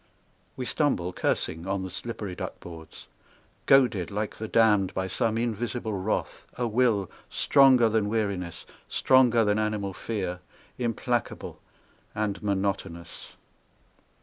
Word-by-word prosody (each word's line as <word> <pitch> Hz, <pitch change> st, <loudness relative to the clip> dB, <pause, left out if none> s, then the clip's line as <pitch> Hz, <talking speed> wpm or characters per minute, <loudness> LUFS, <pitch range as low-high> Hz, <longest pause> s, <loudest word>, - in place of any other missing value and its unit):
We 130 Hz, -, -3 dB
stumble, 105 Hz, -, 0 dB
cursing, 80 Hz, 0 st, -1 dB
on 95 Hz, 0 st, -1 dB
the 95 Hz, -, -6 dB
slippery 105 Hz, -1 st, -5 dB
duck -, -, -6 dB
boards. 80 Hz, -2 st, -11 dB, 0.6 s
Goaded 120 Hz, -10 st, +4 dB
like 105 Hz, +1 st, -3 dB
the 110 Hz, -, -5 dB
damned 105 Hz, -4 st, +3 dB
by 95 Hz, -, -1 dB
some 110 Hz, +4 st, 0 dB
invisible 115 Hz, -1 st, -2 dB
wrath, 100 Hz, +2 st, -2 dB
A 125 Hz, -, 0 dB
will 110 Hz, -5 st, +1 dB, 0.2 s
stronger 135 Hz, -4 st, +5 dB
than 110 Hz, -2 st, +1 dB
weariness, 100 Hz, -6 st, -2 dB, 0.2 s
stronger 120 Hz, -3 st, +4 dB
than 105 Hz, +1 st, +2 dB
animal 105 Hz, -2 st, -1 dB
fear, 95 Hz, -4 st, -4 dB, 0.4 s
Implacable 120 Hz, 0 st, -2 dB, 0.6 s
and 105 Hz, -3 st, -2 dB
monotonous. 95 Hz, -4 st, -3 dB
105 Hz, 120 wpm, -27 LUFS, 95-115 Hz, 0.6 s, stronger